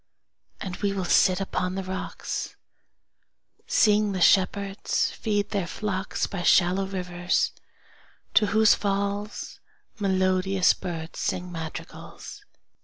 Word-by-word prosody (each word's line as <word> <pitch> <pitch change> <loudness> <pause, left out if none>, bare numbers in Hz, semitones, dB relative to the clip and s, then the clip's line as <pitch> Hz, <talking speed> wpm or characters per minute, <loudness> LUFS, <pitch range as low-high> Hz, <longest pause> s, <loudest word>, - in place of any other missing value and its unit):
And 185 -3 -5
we 200 -1 -1
will 190 -2 -2
sit 185 +1 +4
upon 185 -1 -2
the 195 - -3
rocks, 190 0 -5 1.1
Seeing 210 -1 +3
the 185 - -2
shepherds 195 +2 +2
feed 205 -2 -1
their 195 -4 -1
flocks, 190 0 -2
By 195 - -5
shallow 185 +2 +3
rivers 180 -2 -1 0.8
to 210 - +5
whose 220 +1 +5
falls 200 +1 -3 0.4
Melodious 190 -1 +2
birds 165 -3 -6
sing 180 0 -2
madrigals. 165 -2 -8
190 Hz, 110 wpm, -26 LUFS, 180-200 Hz, 1.1 s, to